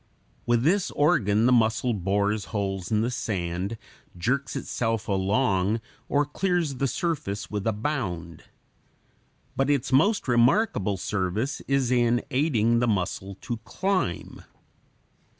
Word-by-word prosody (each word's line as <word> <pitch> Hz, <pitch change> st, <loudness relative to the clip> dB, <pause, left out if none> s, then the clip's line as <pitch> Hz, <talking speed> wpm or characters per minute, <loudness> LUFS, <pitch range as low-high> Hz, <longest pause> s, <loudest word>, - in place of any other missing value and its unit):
With 120 Hz, 0 st, +3 dB
this 180 Hz, +6 st, +2 dB
organ 110 Hz, -7 st, +2 dB
the 125 Hz, -, +4 dB
mussel 115 Hz, 0 st, +2 dB
bores 100 Hz, +2 st, 0 dB
holes 95 Hz, -4 st, -3 dB
in 110 Hz, -1 st, +2 dB
the 120 Hz, +3 st, 0 dB
sand, 95 Hz, -2 st, -3 dB, 0.4 s
jerks 125 Hz, +6 st, -1 dB
itself 115 Hz, -3 st, -2 dB
along, 100 Hz, +1 st, +1 dB, 0.3 s
or 145 Hz, +1 st, +2 dB
clears 170 Hz, -2 st, -1 dB
the 135 Hz, -, +1 dB
surface 125 Hz, -, -3 dB
with 105 Hz, 0 st, -2 dB
a -, -, +3 dB
bound. 100 Hz, -, -4 dB, 1.1 s
But 135 Hz, +1 st, +1 dB
its 140 Hz, -3 st, +1 dB
most 195 Hz, +9 st, +3 dB
remarkable 120 Hz, -, +2 dB
service 105 Hz, +8 st, -2 dB
is 135 Hz, -2 st, +1 dB
in 120 Hz, -1 st, +2 dB
aiding 120 Hz, -5 st, +2 dB
the 120 Hz, -, +1 dB
mussel 95 Hz, -1 st, -2 dB
to 120 Hz, -2 st, -4 dB
climb. 185 Hz, -, -2 dB
115 Hz, 125 wpm, -26 LUFS, 100-135 Hz, 1.1 s, the